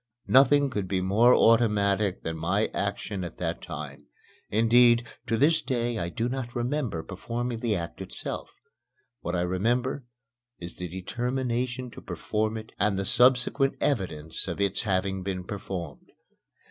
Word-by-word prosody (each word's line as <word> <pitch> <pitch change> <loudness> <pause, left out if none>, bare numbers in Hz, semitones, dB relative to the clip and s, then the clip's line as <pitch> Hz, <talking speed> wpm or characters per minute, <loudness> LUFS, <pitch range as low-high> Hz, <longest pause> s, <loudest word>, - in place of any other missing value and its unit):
Nothing 140 +1 +5
could 100 -5 -2
be 95 0 0
more 105 +7 +5
automatic 105 -4 +3
than 80 - -3
my 90 +7 0
action 100 -1 -3
at 85 - -7
that - - -3
time; 70 -1 -8 0.4
indeed, 120 +2 +5 0.2
to 115 0 +1
this 155 +5 +4
day 120 -4 -1
I 85 0 -2
do 115 +6 -2
not 125 -1 -4
remember 120 - -1
performing 115 +5 -4
the 115 -3 0
act 85 -2 -5
itself. - - -6 0.7
What 85 +7 -3
I 90 - +1
remember 120 +10 0 0.5
is 85 0 -8
the 90 - -4
determination 120 +6 -2
to - - -11
perform 110 +1 -2
it 110 0 -9
and 100 -1 +2
the 100 - -1
subsequent 125 +4 +3
evidence 80 - -1
of - - -4
its 100 -1 +1
having 95 -2 -1
been 95 -1 -3
performed. 90 -7 -6
110 Hz, 145 wpm, -27 LUFS, 95-120 Hz, 0.7 s, Nothing